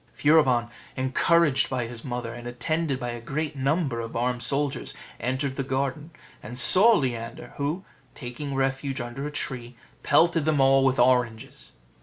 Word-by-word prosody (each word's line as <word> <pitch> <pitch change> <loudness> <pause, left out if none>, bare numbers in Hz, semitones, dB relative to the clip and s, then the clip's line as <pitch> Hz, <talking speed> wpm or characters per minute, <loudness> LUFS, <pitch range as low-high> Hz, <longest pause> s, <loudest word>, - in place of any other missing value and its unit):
Furibon, 130 -6 +3 0.3
encouraged 135 +2 +2
by 125 -2 -2
his 115 0 -8
mother, 120 -3 -5
and 120 0 -9
attended 140 +3 -2
by 120 - -4
a 120 0 -7
great 150 +5 -4
number 140 -2 -1
of 115 0 -6
armed 125 +1 -1
soldiers, 140 +2 -1 0.2
entered 130 +3 -2
the 135 - -1
garden, 135 +3 -3 0.3
and 120 +4 -9
saw 195 - +8
Leander; 120 -3 -4
who, 150 +7 -3 0.3
taking 135 +3 -6
refuge 135 0 -2
under 120 +4 -5
a - - -6
tree, 125 -4 -5 0.3
pelted 165 -2 +3
them 155 -2 +1
all 135 0 +4
with 135 0 +2
oranges. 120 -3 0
130 Hz, 155 wpm, -25 LUFS, 120-145 Hz, 0.3 s, saw